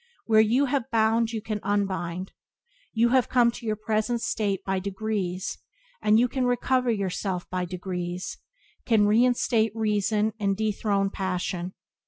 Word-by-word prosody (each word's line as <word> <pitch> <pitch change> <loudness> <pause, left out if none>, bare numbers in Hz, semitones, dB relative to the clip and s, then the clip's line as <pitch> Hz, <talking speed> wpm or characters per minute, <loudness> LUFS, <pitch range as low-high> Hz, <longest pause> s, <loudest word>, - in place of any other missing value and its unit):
Where 220 -1 +5
you 240 +6 +3
have 265 -1 -1
bound 225 0 +2
you 220 -2 -4
can 215 -2 -3
unbind. 190 -3 -2 0.6
You 230 +1 +3
have 255 -1 +3
come 240 -2 +4
to 235 0 -9
your 215 - +1
present 220 +2 -1
state 205 -5 -1
by 190 -1 0
degrees, 195 -1 -3 0.4
and 215 +1 +4
you 245 - +4
can 255 +1 -1
recover 250 +1 +1
yourself 190 -3 -2
by 180 0 -1
degrees, 180 0 -5 0.4
can 220 -3 +3
reinstate 225 0 +2
reason 215 0 +1
and 195 -2 0
dethrone 205 -2 0
passion. 180 -1 -3
215 Hz, 145 wpm, -26 LUFS, 190-230 Hz, 0.6 s, Where